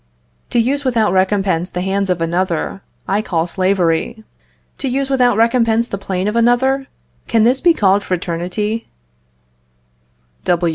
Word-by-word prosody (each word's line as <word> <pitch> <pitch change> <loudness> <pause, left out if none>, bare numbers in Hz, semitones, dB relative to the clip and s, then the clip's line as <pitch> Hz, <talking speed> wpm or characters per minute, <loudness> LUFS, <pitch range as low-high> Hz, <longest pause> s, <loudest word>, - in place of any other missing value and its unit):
To - - -1
use 270 +5 +1
without 230 -7 +1
recompense 190 -2 +1
the 180 - -4
hands 195 +1 -1
of 180 -2 0
another, 175 +2 -1 0.3
I 200 +3 +1
call 165 -6 -1
slavery; 185 +4 0 0.6
to 275 - -3
use 270 +2 -1
without 245 -4 +3
recompense 230 0 +2
the 200 - -5
plane 190 0 -2
of 210 - -1
another, 265 +3 +2 0.4
can 225 -2 +2
this 250 +4 +3
be 340 -2 +4
called 200 0 +2
fraternity? 185 +5 -3
205 Hz, 135 wpm, -17 LUFS, 185-240 Hz, 0.6 s, be